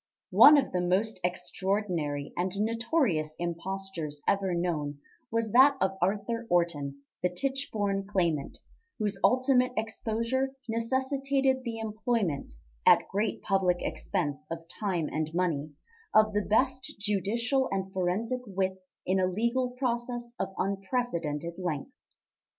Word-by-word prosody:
One 295 +1 +9
of 275 - +1
the 180 - 0
most 190 +4 +1
extraordinary 180 -5 -2
and 180 +2 -1
notorious 220 - +1
impostures 175 -3 -4
ever 195 -3 +2
known 155 -5 -1 0.3
was 230 -1 -1
that 270 +4 +7
of 190 0 +1
Arthur 210 +5 -1
Orton, 145 -6 0 0.2
the 180 - +2
Tichborne 205 -3 -2
Claimant, 170 -8 0 0.4
whose 205 -3 0
ultimate 255 0 +4
exposure 230 +4 -1
necessitated 265 +3 0
the 230 -2 -4
employment, 220 - -1 0.3
at - - +6
great 205 +1 -1
public 190 -3 +2
expense 150 -5 -2
of 165 0 -5
time 180 -7 0
and 155 0 -2
money, 160 -5 0 0.5
of 215 0 +5
the 210 - +2
best 260 +5 +1
judicial 225 +6 0
and 190 0 -2
forensic 205 +8 -1
wits 190 -1 -3
in 190 +1 +2
a 185 - +3
legal 235 +7 0
process 240 -1 -3
of - - -2
unprecedented 185 - -2
length. 160 -6 -3
200 Hz, 120 wpm, -29 LUFS, 175-235 Hz, 0.5 s, One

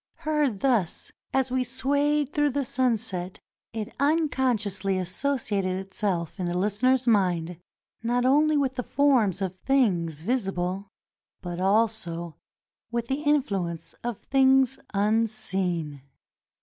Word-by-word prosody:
Heard 295 -9 +1
thus, 235 -11 0 0.2
as 265 -1 +1
we 255 0 +1
swayed 285 +3 0
through 295 -1 +2
the 280 +1 -1
sunset, 225 -8 -1 0.3
it 220 0 -5
unconsciously 255 - +1
associated 195 -1 -1
itself 190 -3 -3
in 180 - -1
the 175 - -2
Kstener's 225 +7 +2
mind, 180 -7 +1 0.4
not 245 +2 0
only 300 +3 +4
with 270 -2 +1
the 250 - -1
forms 245 - +2
of 185 -1 -4
things 180 - +1
visible, 195 -4 -1 0.6
but 175 -1 -5
also 190 -5 0 0.5
with 235 0 -3
the 270 +2 -1
influence 200 - -1
of 240 -3 -3
things 265 0 +3
unseen. 195 -8 0
225 Hz, 115 wpm, -26 LUFS, 185-265 Hz, 0.6 s, only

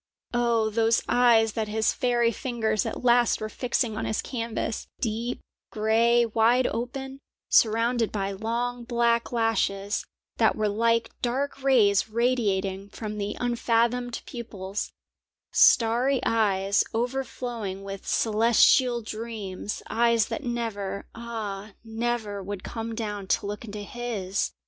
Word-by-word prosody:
Oh, 235 -2 +2
those 225 +1 +2
eyes 230 -3 +4
that 220 -1 -2
his 220 +1 +1
fairy 240 -2 +2
fingers 220 -4 -1
at - - -5
last 240 -1 +4
were 215 - -4
fixing 240 -1 -1
on 215 - -3
his 220 - -1
canvas: 230 -2 -3
deep, 230 +2 -2 0.3
grey, 230 +2 +3
wide 230 +3 +3
open, 265 +3 -4 0.3
surrounded 230 +1 +3
by 195 -1 -2
long 235 +4 -2
black 235 -1 +1
lashes 215 -3 0 0.3
that - - +3
were 215 -1 0
like 230 +2 +1
dark 270 +3 -2
rays 220 -7 +4
radiating 205 -5 0
from 210 0 -6
the 205 0 -3
unfathomed 240 0 0
pupils, 205 -5 -5 0.6
starry 245 +3 +4
eyes 200 -3 +2
overflowing 240 -5 -3
with 195 0 -7
celestial 235 +2 +4
dreams, 215 -3 -5
eyes 230 -2 +2
that 300 - -4
never, 225 -5 -3
ah, 215 -3 -6
never 225 -2 -2
would 200 0 -6
come 225 0 -5
down 210 -3 -4
to - - +1
look 205 +2 -5
into 205 -1 -6
his! 205 -4 -3
230 Hz, 125 wpm, -26 LUFS, 210-240 Hz, 0.6 s, eyes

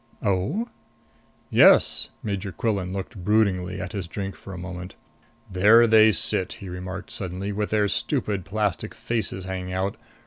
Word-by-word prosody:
"Oh?" 100 - 0 0.8
"Yes." - - +5
Major 100 -2 -3
Quillan 95 -1 -2
looked 95 0 -6
broodingly 95 -3 +1
at 95 -1 -5
his 95 -4 -4
drink 95 +2 -5
for 95 - -11
a 95 - -7
moment. 90 +1 -7 0.6
"There 105 +6 +6
they 110 -1 +6
sit," 90 - -1
he 95 - -9
remarked 90 +2 -7
suddenly, 95 -3 -4
"with 105 +1 -2
their 105 -1 +2
stupid 105 - -1
plastic 100 -1 -2
faces 110 -5 -3
hanging 90 -1 -4
out! 95 +2 -2
95 Hz, 145 wpm, -24 LUFS, 90-105 Hz, 0.8 s, There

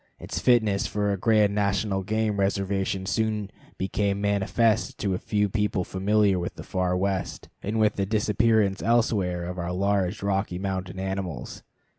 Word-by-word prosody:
Its - - -5
fitness 110 -5 +3
for 105 -1 0
a - - 0
grand 105 0 +3
national 100 -1 0
game 105 +1 -1
reservation 95 -1 0
soon 105 0 -1 0.3
became 100 +1 -1
manifest 105 +3 +1
to 100 -3 -1
a 90 - -2
few 105 -1 0
people 105 -1 0
familiar 100 +1 +2
with 85 - -4
the - - -8
far 90 -1 -1
West, 95 0 -2
and 110 +3 -2
with 110 -1 +2
the 100 - +1
disappearance 105 -1 +2
elsewhere 100 -7 +1
of 90 +1 -5
our 85 0 -3
large 100 +1 0
Rocky 100 -2 -1
Mountain 95 -1 -4
animals. 95 -8 -4
100 Hz, 155 wpm, -26 LUFS, 95-105 Hz, 0.3 s, fitness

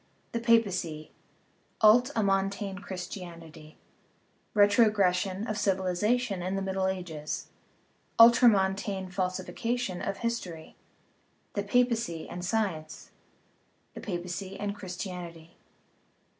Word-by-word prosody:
The 230 - -1
Papacy 185 -10 +1 0.7
(Ult 240 +4 +7
amontane 195 -1 0
Christianity) 170 -5 -8 0.8
Retrogres 205 -2 +5
sion 190 +3 -3
of 215 -2 -3
Civilization 195 +3 0
in 185 +2 -2
the 195 - -2
Middle 190 0 -1
Ages 175 -5 -4 0.7
Ultramontane 195 -5 +5
Falsi 185 0 -2
fication 235 -6 -2
of 195 - -3
History 185 -9 -4 0.8
The 205 - -1
Papacy 230 -6 0
and 175 0 -7
Science 185 -5 -2 0.8
The - - -8
Papacy 185 +1 -5
and 205 0 -2
Christianity 180 -3 -6
III. - - -30
195 Hz, 100 wpm, -29 LUFS, 180-215 Hz, 0.8 s, Ult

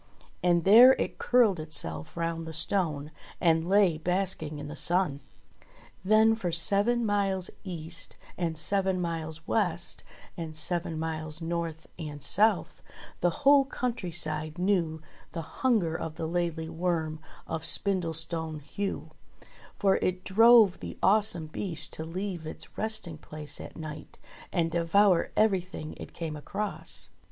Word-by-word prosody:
And 175 -1 +3
there 235 +7 +9
it - - -3
curled 230 -8 +3
itself 80 - -3
round 165 -1 -2
the 160 - -6
stone, 160 -3 +1 0.3
and 165 0 +2
lay 190 -5 +4
basking 180 -3 -1
in 145 0 -7
the 150 - -7
sun. 175 -4 +1 0.8
Then 215 +3 +5
for 190 -6 -2
seven 205 +8 +2
miles 195 -3 0
east 165 -3 -6 0.2
and 165 -3 -2
seven 190 +2 0
miles 165 -2 -3
west - - -1 0.3
and 160 -2 -6
seven 170 +1 -2
miles 155 -1 -3
north 165 -1 -4
and 150 -3 -6
south 205 +6 +1 0.4
the 175 - +3 0.2
whole 280 0 +7
country 240 -8 -3
side 155 -1 -1
knew 175 -4 0 0.3
the 165 - -4 0.2
hunger 215 -11 +2
of 160 -1 -5
the 160 - -4
Laidly 165 -1 -2
Worm 160 -2 -2 0.3
of 160 -1 -4
Spindlestone 165 -4 0
Heugh, 195 +8 -5 0.7
for 195 -2 +3
it 185 0 -1
drove 225 -1 +6
the - - -7
awesome 200 -4 +3
beast 160 0 -1
to 160 - -4
leave 175 -1 -5
its - - -8
resting 205 -8 -1
place 150 -1 -5
at - - -10
night 155 -2 -8 0.3
and 165 -3 0
devour 170 +2 +3
everything 185 -7 0
it - - -10
came 160 -2 -4
across. 205 +7 -3
170 Hz, 135 wpm, -28 LUFS, 160-195 Hz, 0.8 s, there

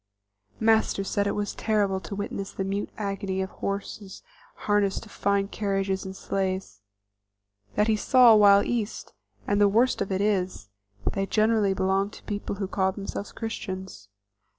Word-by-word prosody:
Master 220 -2 +3
said 200 +1 0
it - - -1
was 205 0 -2
terrible 205 -3 0
to 190 +2 -7
witness 200 -1 -4
the 195 - -3
mute 200 +1 -2
agony 195 -2 -3
of 190 0 -2
horses 200 0 -5 0.4
harnessed 205 -2 +1
to 225 - -13
fine 200 -1 0
carriages 195 -2 -1
and 190 0 -6
sleighs, 190 - -3 0.9
that 210 +1 +3
he 220 - +3
saw 245 +2 +6
while 205 -1 +7
East; 230 -3 -3 0.3
and 205 0 +1
the 205 - +7
worst 235 +5 +2
of 195 - -2
it 190 - 0
is, 185 - -1 0.4
they 195 0 -1
generally 215 -2 +2
belong 190 +1 +1
to - - -14
people 205 -1 -4
who 195 -1 -3
call 190 -1 +1
themselves 200 +1 -6
Christians. 190 - -6
200 Hz, 155 wpm, -26 LUFS, 190-210 Hz, 0.9 s, while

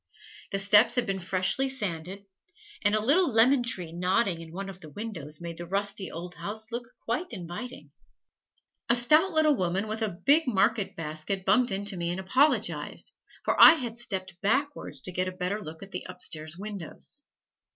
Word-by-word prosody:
The 195 - 0
steps 205 +5 +6
had 245 -1 +2
been 195 -2 -2
freshly 185 +9 +1
sanded, 195 -5 -4 0.6
and 205 0 +2
a - - +2
little 325 +5 +4
lemon 245 +4 +5
tree 185 -9 -3
nodding 180 0 +1
in 165 -1 -10
one 195 +3 -5
of 190 -1 -9
the 155 - -9
windows 160 -5 -6
made 170 -1 -7
the 175 - -6
rusty 200 0 -1
old 175 +2 -7
house 220 +4 -5
look 240 +1 -3 0.2
quite 245 +6 -2
inviting. 185 +6 -7 1.0
A 235 - +5
stout 305 +10 +4
little 315 -3 +3
woman 185 +1 -1
with 215 +1 -4
a 220 - +1 0.2
big 295 +2 +5
market 205 -2 +1
basket, 165 +5 -4
bumped 240 +6 +4
into 200 0 -2
me 170 0 -2
and 175 +2 -3
apologized, 260 +11 0 0.3
for - - +2
I - - +12
had 245 -8 -4
stepped 190 -7 -3
backwards 275 +8 -1
to 185 - -2
get 180 +1 -1
a - - -2
better 185 +3 -3
look 160 -1 -8
at 195 - -12
the 180 - -4
upstairs 155 -2 -4
windows. 205 - -7
195 Hz, 180 wpm, -28 LUFS, 180-235 Hz, 1.0 s, I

